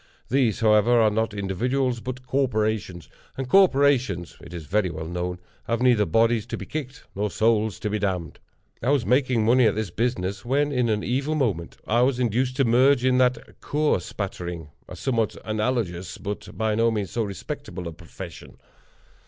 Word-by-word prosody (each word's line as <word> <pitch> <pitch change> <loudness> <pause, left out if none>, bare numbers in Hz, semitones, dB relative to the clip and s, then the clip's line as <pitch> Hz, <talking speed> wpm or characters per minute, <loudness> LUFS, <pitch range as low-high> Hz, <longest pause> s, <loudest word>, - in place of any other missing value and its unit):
These, 125 -5 +1
however, 110 +2 +4
are 110 -2 +4
not 110 +1 0
individuals, 120 +6 -1
but 130 +2 -6
corporations; 110 - -1 0.3
and 135 -1 -3
corporations, 135 - +3
it 85 - -12
is 85 -3 -7
very 95 +4 +1
well 80 -1 -6
known, 90 +2 -3 0.3
have 115 -1 -1
neither 120 -5 +3
bodies 115 +4 +2
to - - -4
be - - -7
kicked 135 -4 -6
nor 105 +2 -1
souls 110 0 +1
to - - -2
be 105 - -1
damned. 95 -4 -2 0.4
I 120 - 0
was 140 -4 +2
making 125 -3 +2
money 120 +1 +5
at 105 - +1
this 110 -4 -3
business 100 -3 -2
when, 145 +4 +1
in 125 -3 +1
an 105 -1 0
evil 135 +5 -1
moment, 105 - -1
I 120 +2 +2
was 125 0 +2
induced 125 +2 0
to 135 0 +2
merge 125 +2 +4
it - - +5
in 130 0 +3
the 125 0 +1
Cur 150 -6 +1
Spattering—a 85 -5 -7
somewhat 115 -5 -1
analogous, 110 -5 -2
but, 100 -2 -6
by 110 0 +1
no 115 +2 +3
means, 105 -4 -2
so 120 - -1
respectable 90 -3 -5
a - - -5
profession. - - -11
115 Hz, 175 wpm, -24 LUFS, 100-125 Hz, 0.4 s, money